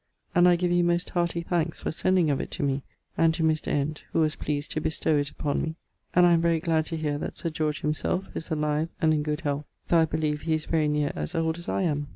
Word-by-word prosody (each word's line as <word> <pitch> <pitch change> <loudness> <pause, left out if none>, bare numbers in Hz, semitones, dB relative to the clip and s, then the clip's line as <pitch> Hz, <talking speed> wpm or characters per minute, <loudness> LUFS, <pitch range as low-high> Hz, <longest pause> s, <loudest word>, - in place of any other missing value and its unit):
And 180 0 +6
I 175 - +5
give 175 0 0
you 175 0 +3
most 175 0 +1
hearty 170 -1 0
thankes 170 -1 -1
for - - -2
sending 175 -1 +2
of 140 - 0
it - - -6
to - - -3
me, 140 0 0 0.4
and 165 -1 +4
to 165 - -1
Mr. 155 -1 +1
Ent 145 +1 -1
who - - +2
was 155 -1 +1
pleased 145 0 -3
to 155 - -2
bestow 155 0 +1
it 145 -1 0
upon 145 -1 -2
me, 160 0 -3 0.4
and 180 0 +7
I 175 - +6
am 165 - +3
very 165 -1 +2
glad 160 -2 +1
to 165 - -3
hear 150 -2 -1
that - - -5
Sir 165 - -3
George 155 -2 -1
him 150 +1 +1
selfe 180 +4 -2
is 160 - -5
alive 150 0 0
and 160 -2 +3
in 150 - +1
good 150 +1 -2
health, 145 -1 -2 0.2
though 170 - +5
I 160 - +5
believe 155 -1 -1
he 160 -1 +1
is 155 - -3
very 160 -2 +1
near 150 -1 +1
as 75 -1 -4
old 160 0 0
as 170 - -7
I - - 0
am. 145 -4 0
160 Hz, 270 wpm, -27 LUFS, 150-170 Hz, 0.4 s, and